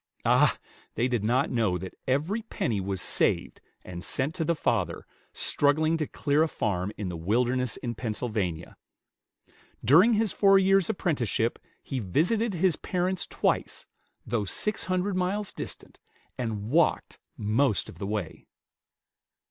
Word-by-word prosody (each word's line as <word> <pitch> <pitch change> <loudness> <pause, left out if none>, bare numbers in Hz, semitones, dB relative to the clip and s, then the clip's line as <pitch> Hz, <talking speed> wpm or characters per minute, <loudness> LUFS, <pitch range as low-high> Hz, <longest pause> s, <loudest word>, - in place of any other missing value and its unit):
Ah! - - +4 0.4
they 120 - +1
did 120 -5 -1
not 125 +6 +1
know 110 -7 +1
that 95 +1 -7
every 155 - 0
penny 115 - -2
was 95 0 -3
saved - - 0 0.2
and 90 -1 -8
sent 135 +8 -1
to 165 - -2
the 170 +2 +1
father, - - -1 0.3
struggling 155 +3 +2
to 155 -2 -2
clear 145 +1 +1
a 160 - +4
farm 100 - -2
in 105 - -4
the 90 - -5
wilderness 120 +8 0
in 120 -2 -4
Pennsylvania. 105 -7 -3 1.1
During 180 - +6
his 215 -2 +2
four 195 -1 +5
years' 195 -1 +3
apprenticeship 130 - 0 0.2
he 135 - -3
visited 180 - +1
his 175 -1 +2
parents 185 0 -1
twice, - - -1 0.4
though 115 -2 -1
six 210 - -1
hundred 185 +1 0
miles 190 +3 -1
distant, - - -7 0.4
and 110 -2 -4
walked 165 +1 +1 0.2
most 110 +2 +1
of - - -12
the 100 - -4
way. 100 -6 -4
130 Hz, 140 wpm, -27 LUFS, 105-180 Hz, 1.1 s, During